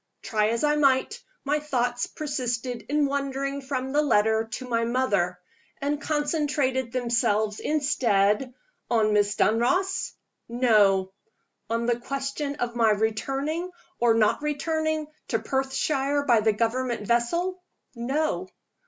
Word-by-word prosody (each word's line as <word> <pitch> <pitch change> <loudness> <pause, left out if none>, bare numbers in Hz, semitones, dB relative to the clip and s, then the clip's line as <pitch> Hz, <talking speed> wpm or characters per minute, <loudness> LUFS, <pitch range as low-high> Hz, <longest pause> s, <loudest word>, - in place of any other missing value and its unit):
Try 215 -2 +1
as 230 +3 -1
I 300 0 +3
might, 270 -3 +2 0.2
my 295 +2 +1
thoughts 245 -5 -1
persisted 250 -5 -3
in 295 0 +2
wandering 275 0 -2
from 265 -1 -3
the 295 +2 +3
letter 220 -5 +2
to 255 - -5
my 230 -1 0
mother, 210 -8 0 0.4
and 290 +1 -1
concentrated 290 -5 0
themselves 225 -4 0
instead 250 -6 +1 0.4
on 220 -3 +2
Miss 205 -1 +2
Dunross? 360 - +1 0.4
No. 210 -6 +3 0.6
On 230 +1 0
the 240 0 +1
question 275 +3 -3
of 240 -4 -3
my 230 -2 +4
returning, 270 - -1 0.3
or 235 -1 +4
not 220 +4 +2
returning, 315 +1 -1 0.2
to 225 - +1
Perthshire 270 +3 0
by 240 -5 +5
the 220 +1 +3
Government 235 +1 -1
vessel? 340 - 0 0.3
No. 290 +9 -1
255 Hz, 125 wpm, -26 LUFS, 230-290 Hz, 0.6 s, by